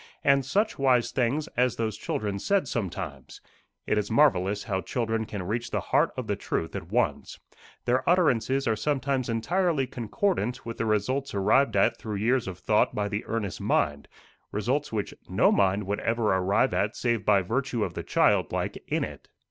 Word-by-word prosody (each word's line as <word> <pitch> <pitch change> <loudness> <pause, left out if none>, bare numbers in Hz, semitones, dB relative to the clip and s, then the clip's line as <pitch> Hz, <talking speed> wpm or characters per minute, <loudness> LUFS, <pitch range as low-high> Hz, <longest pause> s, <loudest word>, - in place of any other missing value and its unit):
And 140 -1 +4
such 200 - 0
wise 130 -3 +3
things 135 +5 0
as 125 -1 +1
those 110 -3 -2
children 105 -1 -3
said 195 - +1
sometimes! 90 - -5 0.5
It 105 - +1
is 105 - -3
marvellous 105 -7 +3
how 95 -3 -2
children 110 +4 -2
can 105 -3 -5
reach 115 +6 -3
the - - -1
heart - - +4
of - - -3
the - - -1
truth 80 - -3
at - - -6
once. - - -1 0.5
Their 125 +5 +1
utterances 135 -6 +2
are 110 - +2
sometimes 135 +1 -1
entirely 155 +5 +1
concordant 125 - -2
with 115 0 -6
the 115 - 0
results 110 +5 0
arrived 105 +5 +3
at 100 - +3
through 110 -2 -5
years 115 +4 +1
of 95 -2 -5
thought 105 +4 +1
by 105 -1 -1
the 105 +1 -3
earnest 110 -4 -3
mind 75 0 0 0.4
results 130 +8 -1
which 105 -3 -3 0.2
no - - +4
mind 100 +1 +2
would 100 +2 -2
ever 115 -3 +1
arrive 100 +7 +2
at 105 +2 0
save 115 -4 0
by 100 -2 +4
virtue 120 +2 -1
of - - -3
the - - -4
child - - +2
like - - -3
in - - 0
it. - - -8
115 Hz, 180 wpm, -27 LUFS, 100-130 Hz, 0.5 s, And